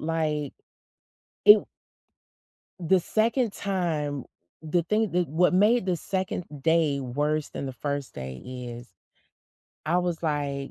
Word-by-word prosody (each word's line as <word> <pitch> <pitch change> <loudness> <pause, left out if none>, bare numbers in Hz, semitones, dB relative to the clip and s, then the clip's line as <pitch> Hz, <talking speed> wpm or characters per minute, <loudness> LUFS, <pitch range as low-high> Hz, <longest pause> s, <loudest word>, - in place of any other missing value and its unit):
like, 155 -3 -1 0.9
it 210 - +12
w 210 - -4 1.1
the 180 +2 +3
second 225 +4 +1
time 160 -9 -2 0.4
the 170 +3 +1
thing 215 +2 +1
that 175 -3 +1
what 175 +5 +3
made 210 +3 +4
the 180 -2 +1
2nd 185 +1 -3 0.2
day 160 -4 +2
worse 145 +4 -1
than 140 - -5
the 135 - -4
1st 140 +1 -4
day 65 0 -7
is 125 -1 -7 1.0
I 170 +3 +2
was 175 -2 -2
like, 145 -3 -2
160 Hz, 130 wpm, -26 LUFS, 140-180 Hz, 1.1 s, it